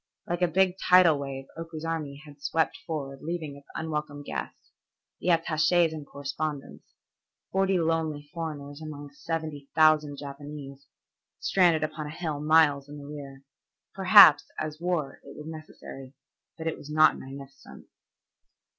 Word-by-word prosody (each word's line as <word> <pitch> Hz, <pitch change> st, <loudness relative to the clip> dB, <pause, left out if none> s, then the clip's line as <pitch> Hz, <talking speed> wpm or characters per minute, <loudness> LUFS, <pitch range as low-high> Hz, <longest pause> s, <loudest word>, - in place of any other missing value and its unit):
Like 175 Hz, +1 st, -2 dB
a 180 Hz, -, +4 dB
big 185 Hz, +2 st, +2 dB
tidal 180 Hz, -5 st, +6 dB
wave 135 Hz, -1 st, -5 dB
Oku's 165 Hz, -1 st, -7 dB
army 155 Hz, -3 st, -4 dB
had 145 Hz, -1 st, -15 dB
swept 155 Hz, +3 st, 0 dB
forward 135 Hz, -4 st, -4 dB
leaving 160 Hz, -3 st, -4 dB
its 140 Hz, 0 st, -16 dB
unwelcome 150 Hz, -2 st, -4 dB
guests, -, -, -7 dB, 0.5 s
the -, -, -1 dB
attaches 165 Hz, 0 st, +3 dB
and 150 Hz, -3 st, -7 dB
correspondents, 145 Hz, +1 st, -6 dB, 0.6 s
forty 195 Hz, 0 st, +2 dB
lonely 160 Hz, -3 st, -1 dB
foreigners 150 Hz, -3 st, -6 dB
among 145 Hz, -2 st, -8 dB
seventy 155 Hz, -2 st, -5 dB
thousand 155 Hz, -2 st, +4 dB
Japanese, 140 Hz, -1 st, -9 dB, 0.5 s
stranded 170 Hz, -5 st, +3 dB
upon 155 Hz, 0 st, -4 dB
a -, -, -6 dB
hill 155 Hz, -2 st, -4 dB
miles 150 Hz, -2 st, +4 dB
in 145 Hz, -, -8 dB
the 145 Hz, -, -10 dB
rear. 140 Hz, -2 st, -9 dB, 0.5 s
Perhaps, 190 Hz, -4 st, +8 dB
as 155 Hz, 0 st, -4 dB
war, 175 Hz, -5 st, -2 dB
it 140 Hz, -, -12 dB
was 150 Hz, -, -8 dB
necessary, 155 Hz, -4 st, -10 dB, 0.4 s
but 160 Hz, -, -7 dB
it 160 Hz, -, -2 dB
was 145 Hz, -, -11 dB
not 155 Hz, +1 st, +4 dB
magnificent. 135 Hz, 0 st, -11 dB
155 Hz, 140 wpm, -27 LUFS, 145-165 Hz, 0.6 s, Perhaps